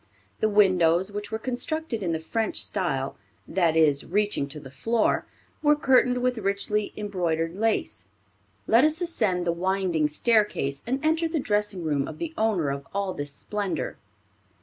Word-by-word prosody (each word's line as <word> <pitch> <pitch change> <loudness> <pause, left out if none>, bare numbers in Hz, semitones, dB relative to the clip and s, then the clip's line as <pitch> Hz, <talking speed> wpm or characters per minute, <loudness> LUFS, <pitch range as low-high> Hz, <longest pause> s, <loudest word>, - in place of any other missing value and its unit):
The 220 - +2
windows, 185 -3 +4
which 205 +1 -5
were 220 - -1
constructed 255 +2 -3
in 175 -3 -1
the 160 - 0
French 220 +8 -2
style, 135 -9 -2 0.3
that 170 -4 +2
is, 150 -3 +4
reaching 205 -5 0
to 150 +2 -8
the 135 -3 -11
floor, 225 +9 0 0.3
were 295 -1 +5
curtained 250 -3 +3
with 250 -2 +1
richly 200 +1 -1
embroidered 170 -5 -1
lace. 190 - -1 0.6
Let 230 +3 +5
us 310 +1 +3
ascend 215 - 0
the 170 - +2
winding 175 -3 0
staircase, 205 - +1
and 265 +5 -1
enter 320 +1 +2
the 320 -1 -1
dressing 210 -6 -1
room 145 -3 0
of - - -8
the 335 -1 -4
owner 200 - +1
of 140 0 -6
all 200 -2 -1
this 145 -3 -5
splendor. 205 +6 -3
200 Hz, 160 wpm, -26 LUFS, 165-230 Hz, 0.6 s, were